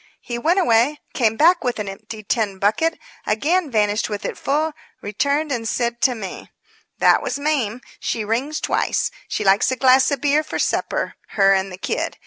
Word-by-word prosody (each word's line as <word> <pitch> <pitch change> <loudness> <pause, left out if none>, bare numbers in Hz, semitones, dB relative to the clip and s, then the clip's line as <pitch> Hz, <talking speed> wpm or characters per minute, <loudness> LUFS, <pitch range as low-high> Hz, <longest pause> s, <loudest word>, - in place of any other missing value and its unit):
He 240 -1 -5
went 335 +8 +2
away; 285 -3 +3
came 225 -3 +1
back 340 +2 +4
with 245 -2 -1
an 210 -2 -4
empty 215 +2 -8
tin 205 -2 -1
bucket; 220 +13 +1 0.3
again 305 +10 +1
vanished 210 -2 +1
with 205 -1 -5
it - - -3
full; 305 +3 -1 0.3
returned 280 +9 -1
and 230 -4 -2
said 235 -1 -2
to 255 - +3
me: 195 -5 -7 0.5
"That - - +4
was - - -3
Mame. 275 -6 -1 0.2
She 220 -2 -2
rings 260 +8 -1
twice. - - 0 0.2
She - - -2
likes 195 0 +4
a - - 0
glass 260 +1 +5
of 280 -2 -1
beer 290 +3 +2
for - - -5
supper. - - -1 0.2
Her 195 -1 +6
and 195 0 0
the 180 - -8
kid. - - -3
235 Hz, 185 wpm, -21 LUFS, 210-290 Hz, 0.5 s, Her